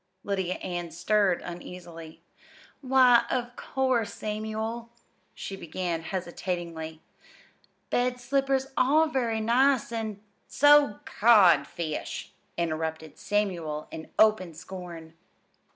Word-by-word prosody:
Lydia 190 Hz, -2 st, -1 dB
Ann 175 Hz, -2 st, -5 dB
stirred 185 Hz, +2 st, +1 dB
uneasily. 170 Hz, -2 st, -9 dB, 0.6 s
"Why, 255 Hz, -3 st, +5 dB
of 245 Hz, -1 st, -2 dB
course, 255 Hz, -5 st, -1 dB
Samuel," 220 Hz, +2 st, -4 dB, 0.5 s
she 195 Hz, -, -6 dB
began 170 Hz, -1 st, -3 dB
hesitatingly, 170 Hz, -2 st, -5 dB, 0.9 s
"bed 250 Hz, 0 st, +1 dB
slippers 270 Hz, +1 st, 0 dB
are 300 Hz, +5 st, +4 dB
very 240 Hz, -6 st, -1 dB
nice, 250 Hz, +2 st, +3 dB
an' 220 Hz, -3 st, -4 dB, 0.2 s
" -, -, -43 dB
"So's 290 Hz, -5 st, +5 dB
codfish!" 180 Hz, -, +2 dB, 0.3 s
interrupted 160 Hz, -1 st, -3 dB
Samuel 170 Hz, -8 st, -2 dB
in 160 Hz, -, -8 dB
open 210 Hz, -6 st, +3 dB
scorn. 170 Hz, -1 st, -9 dB
200 Hz, 95 wpm, -27 LUFS, 170-245 Hz, 0.9 s, Why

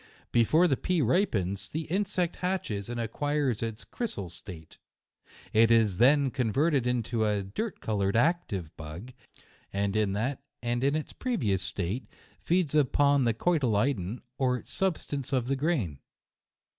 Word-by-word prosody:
Before 155 Hz, +10 st, +4 dB
the 140 Hz, -, +2 dB
pea 180 Hz, -2 st, 0 dB
ripens, 100 Hz, -, 0 dB
the 160 Hz, -, -2 dB
insect 185 Hz, +1 st, -1 dB
hatches 150 Hz, -, -2 dB
and 120 Hz, 0 st, -3 dB
acquires 135 Hz, +1 st, -1 dB
its 115 Hz, -1 st, -4 dB
crysal 100 Hz, -, -4 dB
slate; 85 Hz, -2 st, -11 dB, 0.7 s
it 115 Hz, +1 st, +5 dB
is 110 Hz, -5 st, +3 dB
then 140 Hz, +2 st, +5 dB
converted 135 Hz, +2 st, +1 dB
into 120 Hz, -2 st, 0 dB
a 105 Hz, -2 st, +1 dB
dirt 175 Hz, -, -4 dB
coloured, 100 Hz, -2 st, 0 dB
active 120 Hz, -, 0 dB
bug, 80 Hz, +11 st, -8 dB, 0.6 s
and 100 Hz, +1 st, -1 dB
in 105 Hz, -2 st, +2 dB
that 125 Hz, +7 st, -2 dB, 0.2 s
and 120 Hz, +1 st, -1 dB
its 145 Hz, +2 st, 0 dB
previous 115 Hz, -, 0 dB
state, 100 Hz, +8 st, -3 dB, 0.3 s
feeds 175 Hz, -4 st, +1 dB
upon 145 Hz, -1 st, +3 dB
the 115 Hz, -, +3 dB
cotyledon, 120 Hz, -, +1 dB, 0.2 s
or 125 Hz, -2 st, +1 dB
substance 150 Hz, -8 st, -2 dB
of 130 Hz, -3 st, +1 dB
the 135 Hz, +2 st, 0 dB
grain. 130 Hz, -, -1 dB
120 Hz, 135 wpm, -29 LUFS, 105-150 Hz, 0.7 s, it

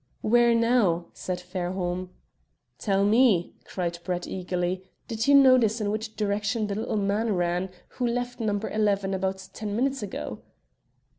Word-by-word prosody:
"Where 235 Hz, +1 st, +4 dB
now?" 230 Hz, -8 st, +2 dB
said 180 Hz, -1 st, -4 dB
Fairholme. 180 Hz, 0 st, -3 dB, 0.7 s
"Tell 195 Hz, -1 st, +1 dB
me," 215 Hz, -5 st, +4 dB
cried 170 Hz, -2 st, -3 dB
Brett 180 Hz, -1 st, -2 dB
eagerly, 180 Hz, 0 st, -2 dB, 0.2 s
"did 225 Hz, 0 st, -2 dB
you 285 Hz, -, +7 dB
notice 255 Hz, -5 st, +6 dB
in 205 Hz, -1 st, -1 dB
which 215 Hz, +1 st, -4 dB
direction 210 Hz, +2 st, 0 dB
the 205 Hz, -, -3 dB
little 220 Hz, +1 st, -2 dB
man 205 Hz, +2 st, 0 dB
ran 175 Hz, +1 st, 0 dB, 0.2 s
who 250 Hz, -, -2 dB
left 245 Hz, +1 st, -2 dB
No. 210 Hz, -3 st, 0 dB
11 200 Hz, -2 st, 0 dB
about 190 Hz, 0 st, -2 dB
ten 210 Hz, -2 st, -4 dB
minutes 270 Hz, +3 st, 0 dB
ago?" 195 Hz, -, -5 dB
205 Hz, 145 wpm, -26 LUFS, 185-230 Hz, 0.7 s, you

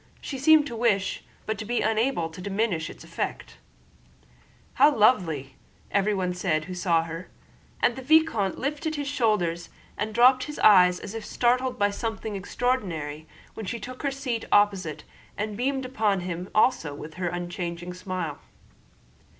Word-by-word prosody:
She 270 Hz, -, -6 dB
seemed 310 Hz, +1 st, +6 dB
to 240 Hz, -, -6 dB
wish, 215 Hz, -5 st, 0 dB, 0.2 s
but 215 Hz, -1 st, -3 dB
to -, -, -3 dB
be 240 Hz, +3 st, 0 dB
unable, 220 Hz, -4 st, +1 dB
to 180 Hz, -, -10 dB
diminish 195 Hz, -4 st, -1 dB
its -, -, -11 dB
effect. -, -, -5 dB, 1.2 s
"How 300 Hz, -, +6 dB
lovely!" 185 Hz, -, +3 dB
said 135 Hz, -1 st, -21 dB, 0.4 s
everyone 195 Hz, -3 st, +1 dB
who 180 Hz, -1 st, -1 dB
saw 170 Hz, -2 st, +2 dB
her; 165 Hz, +2 st, -7 dB, 0.5 s
and 240 Hz, -, +4 dB
the 265 Hz, -, -7 dB
vicomte 265 Hz, -9 st, +3 dB
lifted 300 Hz, +3 st, -2 dB
his 290 Hz, -1 st, -3 dB
shoulders 210 Hz, -11 st, 0 dB, 0.3 s
and 215 Hz, +2 st, -1 dB
dropped 255 Hz, +3 st, +5 dB
his 300 Hz, -, -7 dB
eyes 180 Hz, -3 st, +6 dB
as 200 Hz, -, -8 dB
if 225 Hz, -1 st, -5 dB
startled 250 Hz, +3 st, +1 dB
by 205 Hz, -2 st, +2 dB
something 220 Hz, 0 st, -4 dB
extraordinary 180 Hz, -, -2 dB, 0.3 s
when 220 Hz, -, -7 dB
she 235 Hz, -, -3 dB
took 255 Hz, +2 st, -8 dB
her 280 Hz, -, 0 dB
seat 265 Hz, -4 st, -3 dB
opposite 195 Hz, -6 st, +2 dB, 0.3 s
and 210 Hz, 0 st, -3 dB
beamed 265 Hz, +3 st, -1 dB
upon 215 Hz, -7 st, 0 dB
him 180 Hz, +1 st, -5 dB
also 215 Hz, -, +2 dB
with 155 Hz, +2 st, -9 dB
her 175 Hz, -, 0 dB
unchanging 175 Hz, 0 st, -4 dB
smile. 180 Hz, -4 st, -4 dB
205 Hz, 155 wpm, -26 LUFS, 180-245 Hz, 1.2 s, seemed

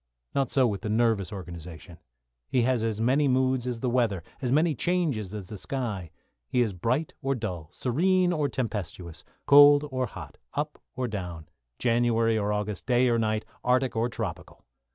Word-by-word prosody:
Not 135 Hz, -3 st, +1 dB
so 135 Hz, -2 st, +3 dB
with 105 Hz, -5 st, -1 dB
the 110 Hz, -, -4 dB
nervous 110 Hz, -4 st, +1 dB
organisation. 85 Hz, -3 st, -9 dB, 0.5 s
He 125 Hz, -, +2 dB
has 125 Hz, -2 st, +1 dB
as 110 Hz, -2 st, -1 dB
many 135 Hz, +6 st, +3 dB
moods 130 Hz, -1 st, +1 dB
as 120 Hz, -2 st, -3 dB
the 125 Hz, -, 0 dB
weather, 115 Hz, -8 st, +1 dB, 0.2 s
as 125 Hz, -2 st, -1 dB
many 155 Hz, +3 st, +3 dB
changes 145 Hz, -, -1 dB
as 105 Hz, -4 st, -7 dB
the 105 Hz, -, -7 dB
sky. 110 Hz, -11 st, -4 dB, 0.4 s
He 125 Hz, -, +1 dB
is 110 Hz, -5 st, +1 dB
bright 125 Hz, -, -1 dB
or 135 Hz, 0 st, 0 dB
dull, 90 Hz, -9 st, -5 dB
serene 180 Hz, +8 st, +2 dB
or 150 Hz, -4 st, 0 dB
tempestuous, 90 Hz, -9 st, -4 dB, 0.2 s
cold 145 Hz, +1 st, +8 dB
or 130 Hz, -1 st, -1 dB
hot, -, -, -10 dB, 0.2 s
up -, -, -3 dB
or 125 Hz, 0 st, -1 dB
down, 90 Hz, -7 st, -6 dB, 0.3 s
January 115 Hz, -1 st, +2 dB
or 105 Hz, -1 st, 0 dB
August, 105 Hz, -1 st, -3 dB
day 125 Hz, 0 st, +4 dB
or 115 Hz, -1 st, +2 dB
night, 110 Hz, -1 st, 0 dB, 0.2 s
Arctic 125 Hz, 0 st, +2 dB
or 115 Hz, +2 st, +1 dB
tropical. 110 Hz, -7 st, -6 dB
115 Hz, 175 wpm, -27 LUFS, 105-130 Hz, 0.5 s, cold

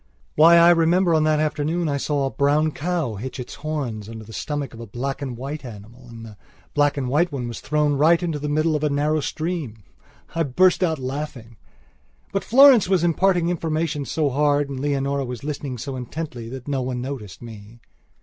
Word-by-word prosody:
Why, 165 Hz, +3 st, +7 dB
I 170 Hz, +1 st, +7 dB
remember 170 Hz, +1 st, +3 dB
on 155 Hz, -1 st, +3 dB
that 155 Hz, -1 st, +2 dB
afternoon 155 Hz, +2 st, -1 dB
I 140 Hz, -1 st, 0 dB
saw 140 Hz, 0 st, -1 dB
a 135 Hz, -, -2 dB
brown 150 Hz, +2 st, +2 dB
cow 155 Hz, -, -2 dB
hitch 130 Hz, +6 st, -6 dB
its 125 Hz, -, -7 dB
horns 130 Hz, -9 st, -4 dB
under 110 Hz, -1 st, -8 dB
the 110 Hz, +1 st, -12 dB
stomach 145 Hz, -2 st, -4 dB
of 115 Hz, -, -11 dB
a 115 Hz, -, -8 dB
black 135 Hz, +7 st, -4 dB
and 130 Hz, -4 st, -5 dB
white 140 Hz, +4 st, -6 dB
animal 120 Hz, +2 st, -11 dB
and 115 Hz, -1 st, -10 dB
the 105 Hz, -2 st, -12 dB, 0.4 s
black 145 Hz, -1 st, +2 dB
and 135 Hz, -2 st, -2 dB
white 155 Hz, +7 st, +1 dB
one 130 Hz, -4 st, -4 dB
was 120 Hz, -, -6 dB
thrown 150 Hz, 0 st, +1 dB
right 160 Hz, +5 st, +3 dB
into 165 Hz, -4 st, -2 dB
the 150 Hz, +1 st, -3 dB
middle 155 Hz, +2 st, +1 dB
of 150 Hz, -, -2 dB
a 150 Hz, -, +2 dB
narrow 150 Hz, +2 st, +1 dB
stream. 155 Hz, -, -4 dB, 0.5 s
I 165 Hz, -, -1 dB
burst 180 Hz, +7 st, +3 dB
out 160 Hz, -3 st, +1 dB
laughing. 130 Hz, -4 st, -6 dB, 0.7 s
But 195 Hz, -, -1 dB
Florence 255 Hz, -5 st, +6 dB
was 185 Hz, -3 st, +2 dB
imparting 175 Hz, 0 st, +2 dB
information 160 Hz, -3 st, -1 dB
so 150 Hz, 0 st, 0 dB
hard 145 Hz, +1 st, +1 dB
and 135 Hz, -, -5 dB
Leonora 140 Hz, 0 st, -1 dB
was 125 Hz, -2 st, -6 dB
listening 140 Hz, -3 st, -4 dB
so 135 Hz, +3 st, -5 dB
intently 125 Hz, -2 st, -6 dB
that 130 Hz, +1 st, -8 dB
no 140 Hz, -2 st, -1 dB
one 125 Hz, -1 st, -3 dB
noticed 120 Hz, -6 st, -7 dB
me. 110 Hz, 0 st, -11 dB
145 Hz, 200 wpm, -22 LUFS, 125-155 Hz, 0.7 s, Why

